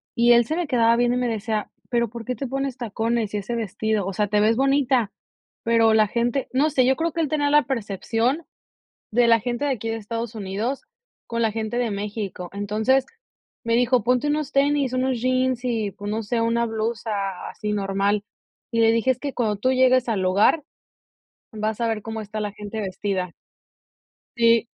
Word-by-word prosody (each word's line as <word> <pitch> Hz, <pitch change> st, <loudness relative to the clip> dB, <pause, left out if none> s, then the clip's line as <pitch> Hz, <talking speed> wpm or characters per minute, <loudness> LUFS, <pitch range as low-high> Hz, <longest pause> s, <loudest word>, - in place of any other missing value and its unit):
y 240 Hz, 0 st, +5 dB
él 235 Hz, 0 st, +5 dB
se 310 Hz, -, -2 dB
me 350 Hz, -1 st, -1 dB
quedaba 230 Hz, -3 st, +4 dB
viendo 245 Hz, 0 st, +2 dB
y -, -, 0 dB
me 250 Hz, -, 0 dB
decía: 220 Hz, -1 st, -2 dB, 0.2 s
"¿Pero 235 Hz, -2 st, +1 dB
por 230 Hz, 0 st, -8 dB
qué 250 Hz, -, -2 dB
te 275 Hz, -, -4 dB
pones 270 Hz, 0 st, -2 dB
tacones 225 Hz, -1 st, -1 dB
y -, -, 0 dB
ese 210 Hz, +4 st, -3 dB
vestido?, 220 Hz, -2 st, -1 dB
o 195 Hz, -, -3 dB
sea, 210 Hz, +2 st, 0 dB
te 210 Hz, +1 st, +1 dB
ves 220 Hz, +2 st, +3 dB
bonita, 270 Hz, -4 st, +2 dB, 0.5 s
pero 230 Hz, -1 st, +4 dB
la 215 Hz, -1 st, +4 dB
gente". 240 Hz, +5 st, -1 dB
No 285 Hz, +4 st, +3 dB
sé, 265 Hz, -4 st, +3 dB
yo 265 Hz, +1 st, +3 dB
creo 330 Hz, +1 st, 0 dB
que 335 Hz, -, -1 dB
el 305 Hz, -, 0 dB
tener 290 Hz, -1 st, +1 dB
la 295 Hz, 0 st, +6 dB
percepción, 230 Hz, -, -1 dB, 0.7 s
de 240 Hz, +1 st, +4 dB
la 230 Hz, -1 st, +5 dB
gente 240 Hz, +4 st, -2 dB
de 290 Hz, -, +1 dB
aquí 225 Hz, -3 st, -4 dB
de 225 Hz, -, -1 dB
Estados 230 Hz, +1 st, -5 dB
Unidos, 215 Hz, +6 st, -3 dB, 0.4 s
con 230 Hz, 0 st, -3 dB
la 225 Hz, -2 st, +2 dB
gente 225 Hz, +2 st, -3 dB
de 240 Hz, -2 st, 0 dB
México. 200 Hz, -3 st, -4 dB
Entonces, 215 Hz, +6 st, +1 dB, 0.6 s
me 230 Hz, 0 st, +1 dB
dijo: 245 Hz, 0 st, +3 dB
"Ponte 250 Hz, +3 st, +2 dB
unos 300 Hz, -1 st, -1 dB
tenis, 280 Hz, -1 st, +2 dB
unos 255 Hz, -1 st, 0 dB
jeans 255 Hz, -1 st, +1 dB
y, 225 Hz, -5 st, -1 dB
pues, 205 Hz, +1 st, -6 dB
no 220 Hz, +2 st, -1 dB
sé, 230 Hz, +2 st, -1 dB
una 235 Hz, +1 st, +1 dB
blusa 225 Hz, 0 st, -3 dB, 0.4 s
así 210 Hz, 0 st, -4 dB
normal". 200 Hz, 0 st, 0 dB, 0.5 s
Y 230 Hz, -, +1 dB
le 225 Hz, 0 st, +5 dB
dije: 230 Hz, +3 st, +2 dB
"Es 255 Hz, -, -11 dB
que 280 Hz, 0 st, -3 dB
cuando 220 Hz, -4 st, 0 dB
tú 255 Hz, +6 st, +1 dB
llegues 255 Hz, -1 st, +4 dB
al 210 Hz, -4 st, 0 dB
lugar, 200 Hz, -, +3 dB, 0.9 s
vas 215 Hz, 0 st, -2 dB
a 230 Hz, -, +2 dB
ver 220 Hz, -1 st, -1 dB
cómo 225 Hz, +1 st, -5 dB
está 215 Hz, +1 st, -6 dB
la 210 Hz, -1 st, -3 dB
gente 210 Hz, +1 st, -6 dB
vestida". 190 Hz, -2 st, -3 dB, 1.1 s
Sí. 230 Hz, 0 st, +4 dB
230 Hz, 200 wpm, -23 LUFS, 215-255 Hz, 1.1 s, la